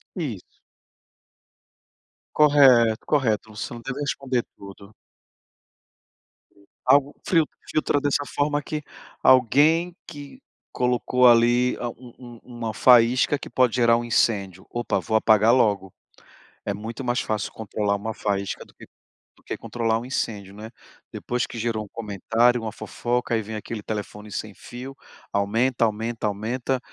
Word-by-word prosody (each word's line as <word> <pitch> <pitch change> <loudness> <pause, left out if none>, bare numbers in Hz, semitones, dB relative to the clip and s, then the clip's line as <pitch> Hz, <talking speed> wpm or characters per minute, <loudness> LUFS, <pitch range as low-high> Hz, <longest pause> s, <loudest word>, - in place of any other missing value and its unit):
Isso. 130 - -6 1.8
Correto, 130 -7 +5
correto. 115 -7 0
Você 110 - -5
não 120 - -8
deve 135 +3 -5
responder 135 -4 -1
tudo. 100 +1 -13 1.9
Algo 140 0 +4
frio 165 -4 +3 0.2
filtra 150 -2 +1
dessa 145 0 0
forma 145 +2 -1
que 155 0 -5 0.4
alguém 155 +8 +4
que 145 - -11 0.3
colocou 125 0 +2
ali 120 +1 +4
a 120 - -3
um 120 0 -13
um 120 -2 -12
uma 120 -3 -6
faísca 125 +4 +5
que - - -10
pode 125 -3 +2
gerar 115 -1 +4
um 120 - -3
incêndio: 100 -5 0
"Opa, 120 -5 -1
vou 110 +4 -2
apagar 110 +2 +4
logo". 100 -6 +1 0.7
É 100 - -1
muito 115 +5 -7
mais 120 0 0
fácil 105 -2 -2
controlar 105 -1 -2
uma 110 +2 -4
faísca 100 -2 -3
do - - -22
que - - -14 0.5
do - - -26
que - - -5
controlar 115 -1 -1
um 120 - -8
incêndio, 100 -6 -4
né. 110 +1 -9 0.4
Depois 125 0 -2
que 120 - -9
gerou 110 -1 -2
um - - -12
comentário, 115 +3 +1
uma 110 -1 -4
fofoca, 120 +2 -3
aí 110 - +2
vem 110 +1 -7
aquele 105 0 -7
telefone 105 0 -6
sem 105 -2 -5
fio, 130 +6 -9 0.4
aumenta, 115 +5 +1
aumenta, 110 +1 -3
aumenta, 120 +5 -2
120 Hz, 140 wpm, -24 LUFS, 110-130 Hz, 1.9 s, Correto